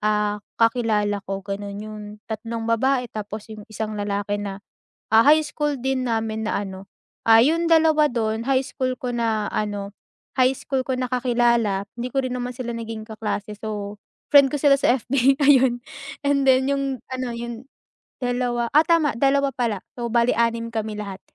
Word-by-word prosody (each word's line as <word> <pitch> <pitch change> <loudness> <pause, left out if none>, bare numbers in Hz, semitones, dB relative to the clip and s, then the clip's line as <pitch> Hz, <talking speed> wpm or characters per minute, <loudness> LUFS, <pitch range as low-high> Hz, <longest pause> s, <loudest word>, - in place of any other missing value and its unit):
ah, 210 0 +1 0.2
kakilala 225 -3 +2
ko 195 0 -3
ganun 200 0 -5
'yung 215 0 -8 0.3
tatlong 225 +1 -4
babae 250 +3 +1
tapos 215 +1 -6
'yung 215 -1 -10
isang 220 0 -4
lalaki 205 0 -2
na, 200 -1 -6 0.5
ah, 220 - +8
high 310 +3 +5
school 295 -1 -2
din 260 +1 -1
namin 220 -1 -1
na 205 - -1
ano, 190 0 -9 0.3
ah, 225 0 +7
'yung 330 +7 +3
2 315 -2 +5
don 225 -1 -1
high 265 +1 +1
school 255 -2 -3
ko 250 -1 -3
na 225 -3 0
ano, 205 -1 -3 0.4
high 260 0 +3
school 265 -2 -2
ko 260 0 -2
na 255 - -1
kakilala 235 -5 +1
hindi 245 +1 -4
ko 270 - 0
rin 255 - -3
naman 250 0 -3
sila 240 -1 -5
naging 225 -1 -6
kaklase 215 -1 -4
so 210 -1 -5 0.4
friend 280 -2 +7
ko 295 - -1
sila 280 -1 +5
sa 270 -2 +2
FB 270 +3 +2
ayun 265 -4 +5 0.5
and 280 -1 +2
then 265 0 +4
'yung 275 -2 -1
ano 255 -1 -3
'yung 235 0 -6 0.6
2 245 -1 -1
ah, 310 - +7
tama 320 -3 +3
2 275 +1 +2
pala, 230 -6 -1 0.2
so 240 -1 -3
bale 235 0 +3
6 230 0 +1
kami 220 -1 -3
lahat. 200 -2 -6
235 Hz, 175 wpm, -23 LUFS, 215-265 Hz, 0.6 s, ah